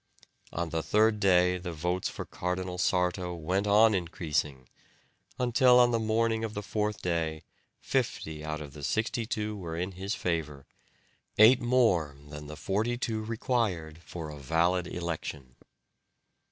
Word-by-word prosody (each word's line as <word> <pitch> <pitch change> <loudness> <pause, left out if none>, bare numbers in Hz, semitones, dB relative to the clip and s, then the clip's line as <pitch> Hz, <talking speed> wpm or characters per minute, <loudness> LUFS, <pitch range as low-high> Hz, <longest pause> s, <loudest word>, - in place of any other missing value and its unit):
On 85 0 -3
the 80 0 -1
third 105 +4 +3
day 90 -2 +4
the 90 -1 -5
votes 90 +3 -1
for - - -6
Cardinal 90 0 -3
Sarto 90 -1 0
went 90 +5 -1
on 110 +2 +6
increasing, 75 -7 -2 0.7
until 125 0 +5
on 120 0 +5
the 115 - +1
morning 110 0 +1
of 110 -1 -4
the 105 - -4
fourth 105 +1 -2
day 80 -3 -1 0.4
fifty 75 -1 -2
out 75 0 -4
of 70 -3 -9
the 75 - -10
sixty 110 - -1
two 105 -2 -2
were 85 -5 -5
in 90 +3 -2
his 95 +3 -4
favour, 75 -5 -3 0.7
eight 115 +5 +7
more 110 - +2
than 75 0 -8
the 75 +1 -8
forty 110 +9 -1
two 110 -3 -2
required 110 -9 -1
for 80 -1 -7
a 75 - -9
valid 85 +5 +1
election. 75 -7 -5
90 Hz, 150 wpm, -29 LUFS, 80-110 Hz, 0.7 s, eight